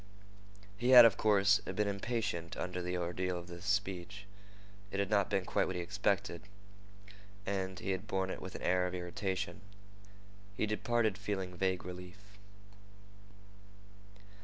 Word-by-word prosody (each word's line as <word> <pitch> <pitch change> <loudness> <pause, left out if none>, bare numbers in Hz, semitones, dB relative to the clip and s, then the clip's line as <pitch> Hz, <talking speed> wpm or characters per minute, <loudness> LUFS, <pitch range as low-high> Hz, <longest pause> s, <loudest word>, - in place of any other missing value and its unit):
He 120 +2 +1
had, 125 -2 +11
of 115 - +5
course, 105 -1 +4
been 105 -1 -2
impatient 100 -4 -2
under 90 0 -3
the 90 +1 -2
ordeal 90 +1 -2
of 85 - -7
this 85 +1 -10
speech. 100 -1 -2 0.6
It 100 - -3
had 100 0 -1
not 100 -2 +3
been 95 -3 0
quite - - +1
what 95 - -3
he 90 - -1
expected, 100 -2 -1 1.0
and 95 -1 -2
he 95 - -3
had 95 +3 -3
borne 95 -1 -1
it - - -6
with 95 - -7
an - - -7
air 90 0 +2
of 90 - -5
irritation. 95 +3 -3 1.0
He - - +1
departed 110 0 0
feeling 95 -3 -3
vague 95 0 0
relief. 90 0 -8
95 Hz, 145 wpm, -34 LUFS, 90-105 Hz, 1.0 s, had